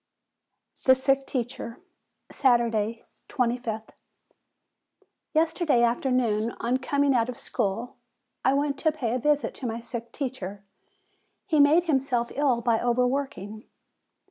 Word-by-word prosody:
THE 260 - +7
SICK 270 +1 +1
TEACHER 235 -2 -4 0.5
Saturday, 230 -4 +1 0.3
25th. 235 -3 -2 1.5
Yesterday 320 -5 +2
afternoon, 235 -2 +1
on 245 +2 +1
coming 280 +2 +1
out 235 -1 +2
of 250 - -5
school, 220 +5 -3 0.5
I 265 - +3
went 280 0 0
to 315 - +2
pay 255 -7 -2
a 255 - 0
visit 290 -2 +1
to 255 - -4
my 230 0 -3
sick 235 0 -7
teacher. 205 -8 -5 0.8
He 315 -6 +1
made 300 +4 +6
him 310 -6 +2
self 245 -3 -1
ill 270 -5 +1
by 230 -2 +2
overworking. 245 -4 -1
250 Hz, 120 wpm, -26 LUFS, 230-275 Hz, 1.5 s, THE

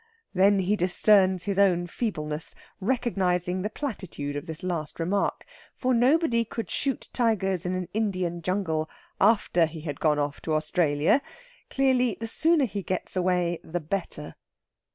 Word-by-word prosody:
Then 195 +2 +4
he 195 +3 +1
discerns 185 0 +3
his 200 0 -1
own 180 -3 +4
feebleness, 165 -6 -4 0.2
recognising 185 -6 0
the 210 - -2
platitude 185 - -5
of 145 - -5
this 160 +2 -4
last 170 -5 -3
remark. 190 +4 -1 0.3
For 255 -1 0
nobody 245 0 +3
could 225 -3 -6
shoot 275 -2 -2
tigers 195 -7 0
in 185 - -1
an 185 -1 -3
Indian 185 -5 -1
jungle 165 -3 -1 0.3
after 195 -5 +3
he 160 0 -9
had 145 -3 -5
gone 150 -2 +2
off 145 -1 -2
to 155 - -1
Australia. 155 - +2 0.5
Clearly 255 -4 +2
the 225 - -4
sooner 315 +5 +3
he 205 -3 -4
gets 185 +1 -3
away 180 -2 +1
the 175 +2 -3
better. 160 -2 -4
185 Hz, 150 wpm, -26 LUFS, 165-220 Hz, 0.5 s, Then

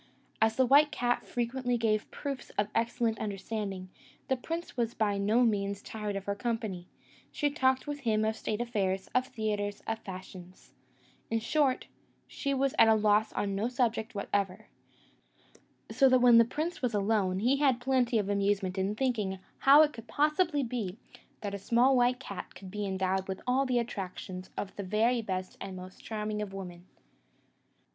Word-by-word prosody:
As 220 0 +3
the 260 - +4
white 290 +4 +6
cat 245 0 -1
frequently 245 +1 -1
gave 215 -2 0
proofs 275 -3 -5
of 205 - +3
an 210 - -21
excellent 230 -1 0
understanding, 195 -2 -4 0.4
the 265 - +3
prince 330 +7 -5
was 235 -2 -1
by 205 -2 +1
no 215 +5 +3
means 200 -3 0
tired 210 -2 -4
of 195 0 -4
her 200 - 0
company; 210 -5 -3 0.4
she 290 -1 0
talked 260 -2 +2
with 290 -1 -4
him 220 -5 +1
of 220 0 0
state 220 0 -3
affairs, 195 -5 -1
of 255 0 +2
theatres, 210 -4 -3
of 225 0 -2
fashions: 185 -2 -10 0.6
in 225 - +1
short, 270 +3 +1 0.4
she 280 - -3
was 275 0 +1
at - - +8
a 220 - +6
loss 215 0 +3
on 200 -1 -1
no 200 +4 0
subject 235 -2 -1
whatever; 200 0 -2 1.2
so 270 -2 +5
that 255 - +6
when 245 -2 +7
the 230 - +6
prince 310 +8 -3
was 245 -4 0
alone, 200 -2 +1
he 245 +7 +2
had 270 -4 +3
plenty 245 -2 +2
of 205 -2 0
amusement 200 -1 0
in 195 +2 0
thinking 215 -6 -1 0.2
how 285 +3 +8
it 300 - 0
could 230 0 -10
possibly 300 0 +2
be, 225 -6 -3 0.4
that 205 -1 -4
a 200 - -4
small 240 +6 +3
white 250 0 +3
cat 200 -7 -8
could 190 -1 -10
be 205 0 -3
endowed 190 0 -1
with 190 -1 -4
all 265 +2 +2
the 250 -1 +1
attractions 190 -5 -4
of 195 -1 -4
the 200 - -3
very 225 +5 +2
best 185 -3 -4
and 190 - -6
most 185 0 -11
charming 210 -1 -3
of 200 -2 -5
women. 180 -2 -8
220 Hz, 180 wpm, -30 LUFS, 200-250 Hz, 1.2 s, at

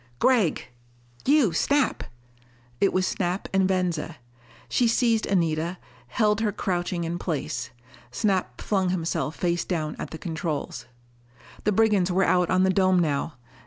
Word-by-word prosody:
"Gregg!" 220 - +2 0.6
"You, 275 - +4
Snap!" 280 - +1 0.8
It 195 - +3
was 185 0 +1
Snap 185 0 -2
and 190 -1 +3
Venza. 180 -4 -1 0.5
She 245 - +2
seized 230 -1 +2
Anita, 170 -1 0 0.3
held 215 -1 +1
her 215 -2 +1
crouching 175 -3 -2
in 170 +1 -3
place. 145 -7 -3 0.4
Snap 185 - -1
flung 190 -3 0
himself 165 -4 -2
face 175 -1 0
down 155 -4 -2
at - - -5
the 160 - -7
controls. 160 -6 -4 0.8
The 210 - +3
brigands 205 -3 +3
were 190 +2 +2
out 180 -1 +2
on 185 0 +3
the 190 - +3
dome 185 -1 +3
now. 155 -3 0
185 Hz, 140 wpm, -25 LUFS, 165-200 Hz, 0.8 s, You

